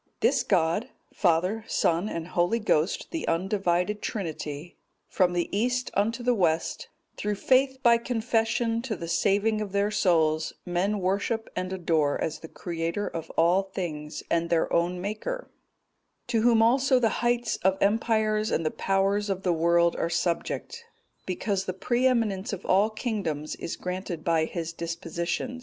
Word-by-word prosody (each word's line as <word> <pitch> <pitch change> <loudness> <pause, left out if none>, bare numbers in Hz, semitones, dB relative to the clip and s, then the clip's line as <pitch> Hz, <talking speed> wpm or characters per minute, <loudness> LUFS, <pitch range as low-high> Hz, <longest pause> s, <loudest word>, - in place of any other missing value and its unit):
This - - +3
God,—Father, 185 +1 0
Son, 170 +5 +1
and 165 -2 -5
Holy 175 +6 +1
Ghost, 185 -6 0
the 330 - -3
undivided 185 +2 0
Trinity,—from 175 0 -3
the 175 -1 0
east 250 +4 0
unto 225 +5 0
the 245 0 +3
west, 170 -7 0 0.3
through 210 0 -1
faith 265 +5 +3
by 235 -2 +6
confession 230 -1 0
to 235 -3 -3
the 170 -2 -6
saving 205 +5 +2
of 200 -2 -5
their 200 +1 +1
souls, 160 -6 +2
men 190 +3 0
worship 205 +5 -1
and 185 0 -3
adore 165 -6 +1
as 155 - -2
the 160 - -9
Creator 170 +4 -3
of 165 - -6
all 175 +4 +4
things, 160 -6 -5
and 170 0 +1
their 170 -1 +1
own 175 +1 +1
Maker; 215 - -4 0.7
to 230 -2 0
Whom 230 -1 +5
also 260 +3 +4
the 235 -3 +3
heights 240 0 +1
of 190 +1 +1
empire 220 +1 +2
and 215 -6 0
the 155 - +1
powers 195 +2 0
of 190 0 -2
the 180 - +2
world 170 +1 +3
are 170 - -1
subject, 175 - -2 0.4
because 195 +1 -1
the 185 - -2
pre 240 +7 +1
eminence 220 -6 0
of 195 - -6
all 200 +3 +4
kingdoms 200 - -3
is - - -4
granted 180 -2 -5
by 165 -2 +2
His 170 0 -5
disposition. 170 +7 -3
195 Hz, 150 wpm, -27 LUFS, 170-225 Hz, 0.7 s, by